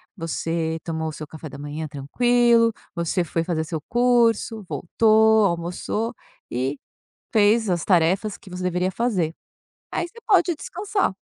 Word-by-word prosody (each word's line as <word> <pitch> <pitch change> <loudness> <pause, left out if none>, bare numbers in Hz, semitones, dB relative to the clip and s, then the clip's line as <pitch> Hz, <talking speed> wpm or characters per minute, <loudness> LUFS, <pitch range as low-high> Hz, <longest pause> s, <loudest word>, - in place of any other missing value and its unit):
você 165 -2 -2
tomou 160 -1 -2
o - - -5
seu 155 0 -8
café 155 +1 -9
da 140 - -10
manhã 145 +2 -5
tranquilo, 230 - +3 0.2
você 170 +1 0
foi 165 0 -1
fazer 165 -2 -1
seu 160 -1 -4
curso, 235 -2 +2
voltou, 220 +3 +4
almoçou 180 +6 -2 0.4
e 130 +4 -2 0.6
fez 220 0 +4
as 175 -3 0
tarefas 190 +3 +2
que 190 - -16
você 180 0 -5
deveria 180 +1 0
fazer. 190 -7 0 0.6
Aí 345 - -1
você 465 +7 -15
pode 365 -4 +4
descansar. 395 - -2
185 Hz, 145 wpm, -23 LUFS, 160-230 Hz, 0.6 s, voltou